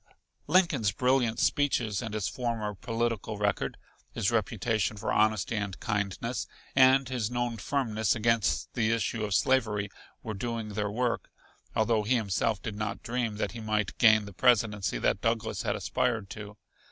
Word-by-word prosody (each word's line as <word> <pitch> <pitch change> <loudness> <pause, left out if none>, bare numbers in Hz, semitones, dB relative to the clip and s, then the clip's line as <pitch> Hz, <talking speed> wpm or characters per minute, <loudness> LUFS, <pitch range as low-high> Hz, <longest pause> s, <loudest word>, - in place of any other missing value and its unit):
Lincoln's 150 - +3
brilliant 125 -2 +2
speeches 120 -8 +1
and 110 -3 -5
his 105 -3 -1
former 115 -4 -2
political 115 0 -2
record, 105 0 -1 0.4
his 115 -3 0
reputation 110 -1 0
for - - -2
honesty 110 +1 +2
and 100 -3 -3
kindness, 105 +3 -2 0.3
and 130 0 +6
his 125 -5 -2
known 120 -1 -2
firmness 110 -5 0
against 115 -1 +1
the 110 -2 +1
issue 115 -1 -1
of 105 -2 0
slavery 110 -6 +1 0.3
were 110 - -4
doing 115 +1 -3
their 105 0 -2
work, 120 +2 -1 0.5
although 110 0 +2
he 115 +5 +1
himself 110 -1 0
did 105 - -4
not 105 -1 -4
dream 120 -2 -2
that - - -1
he 120 - -8
might 105 -2 -1
gain 110 -3 +6
the 100 - -10
presidency 105 - +2
that 95 - +1
Douglas 115 -1 -1
had - - -1
aspired 115 -6 -1
to. 105 -1 -8
110 Hz, 155 wpm, -29 LUFS, 105-120 Hz, 0.5 s, and